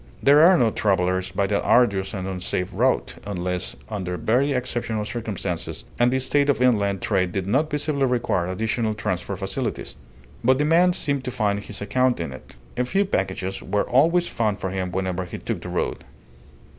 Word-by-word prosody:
There 145 +2 +6
are 185 +2 +7
no 115 -3 +3
travellers 95 -3 +1
by 100 - 0
that 100 +1 0
arduous 100 -5 +2
and 95 -1 -4
unsafe 90 -1 -2
route - - +1
unless 90 -3 -3
under 95 -4 -4
very 130 +9 +1
exceptional 120 -4 -2
circumstances, 105 -7 -4 0.2
and 120 +1 +4
the 130 - +2
state 140 +2 +2
of 140 - +2
inland 100 -6 +2
trade 95 -4 +1
did 95 -2 -2
not 135 +10 +1
visibly 145 -1 0
require 120 -8 0
additional 110 +3 -1
transport 100 -2 -3
facilities; 105 +6 -3 0.5
but 130 +2 +4
the 150 - +1
man 175 +3 +4
seemed 140 -5 -1
to - - -1
find 105 -4 0
his 105 0 -6
account 125 +2 +1
in 80 -6 -4
it. 65 - -13 0.2
A 125 - +2
few 195 +10 +1
packages 95 - -2
were 105 - -1
always 165 +7 +3
found 110 -3 -1
for 95 - -4
him 95 -1 -3
whenever 95 0 -2
he 90 - -7
took - - -4
the - - -7
road. - - -2
105 Hz, 180 wpm, -23 LUFS, 95-130 Hz, 0.5 s, are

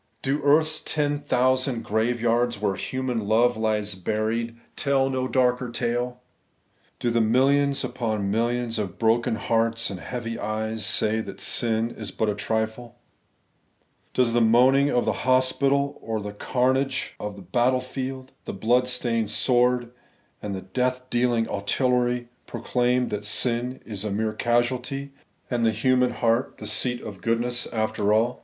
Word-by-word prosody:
Do 140 +2 0
earth's 155 +2 +3
ten 145 -2 -1
thousand 130 -2 +1
graveyards, 120 +1 +1
where 100 -2 0
human 125 -1 -3
love 120 +3 +3
lies 105 -2 0
buried, 110 +5 -2 0.2
tell 135 -2 +1
no 130 -1 -1
darker 125 -1 +1
tale? 120 +1 -2 0.8
Do 120 - 0
the 115 0 +2
millions 135 +5 +3
upon 110 -5 -2
millions 115 +1 0
of 95 -4 -4
broken 115 0 +2
hearts 115 +1 0
and 95 - -6
heavy 115 +2 -5
eyes 110 +1 -3
say 110 +1 +2
that 110 - -7
sin 115 -1 +1
is 110 -4 -6
but 110 +3 -1
a - - -2
trifle? 110 +3 -3 1.2
Does 125 -2 +2
the 120 - +3
moaning 130 +5 +5
of 125 -3 +1
the - - +1
hospital 135 +2 +2
or 110 -1 -3
the 105 0 -6
carnage 130 +4 0
of 105 -1 -5
the 100 - -11
battle 120 +8 +2
field, 130 0 -6
the - - -5
blood 120 +6 +2
stained 115 -3 0
sword, 125 +1 +2 0.5
and 100 -2 -4
the 95 - -5
death 125 +5 -2
dealing 120 -2 +1
artillery, 125 +3 0 0.2
proclaim 125 0 0
that 105 0 -3
sin 120 +4 0
is 105 -3 -4
a 105 - -2
mere 110 +2 -1
casualty, 125 +4 -1 0.4
and 120 -1 0
the 115 - +4
human 125 +3 +2
heart 115 +1 0
the 105 - -8
seat 120 +4 0
of 100 -3 -8
goodness 120 +2 0
after 110 -2 -1
all? 115 +3 +2
120 Hz, 150 wpm, -25 LUFS, 110-130 Hz, 1.2 s, moaning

